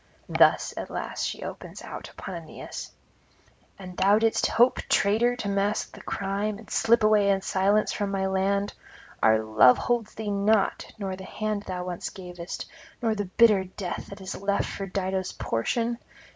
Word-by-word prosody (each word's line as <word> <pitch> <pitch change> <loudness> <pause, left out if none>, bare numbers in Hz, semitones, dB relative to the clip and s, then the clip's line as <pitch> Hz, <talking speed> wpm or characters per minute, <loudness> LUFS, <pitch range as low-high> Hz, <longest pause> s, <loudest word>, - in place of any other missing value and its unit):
Thus - - +4
at - - -5
last - - -3
she - - -5
opens - - -8
out - - -7
upon 190 - -8
Aeneas: 165 -3 -7 0.9
'And 185 -2 -9
thou 195 +3 +4
didst 225 0 +2
hope, 240 +3 +4
traitor, 225 +4 +3
to 220 - -4
mask 200 +1 0
the - - -11
crime, 200 +1 -2
and 215 0 -13
slip 230 0 +3
away 210 -1 +4
in 195 -1 +2
silence 200 +3 +2
from 205 -1 -2
my 195 -1 -1
land? 195 +1 0 0.5
Our 110 0 +5
love 110 +3 +6
holds 235 -3 -1
thee 215 -2 -3
not, 200 +1 +1
nor 195 -3 -3
the 190 0 -9
hand 215 0 -3
thou 180 -1 -3
once 180 -1 -4
gavest, 180 -2 -7 0.3
nor 230 -3 +1
the 205 -1 -2
bitter 200 0 +4
death 185 -1 -5
that 200 0 -10
is 190 - -5
left 200 +1 0
for 195 - -5
Dido's 190 0 -2
portion? 230 - -1
200 Hz, 170 wpm, -26 LUFS, 190-215 Hz, 0.9 s, love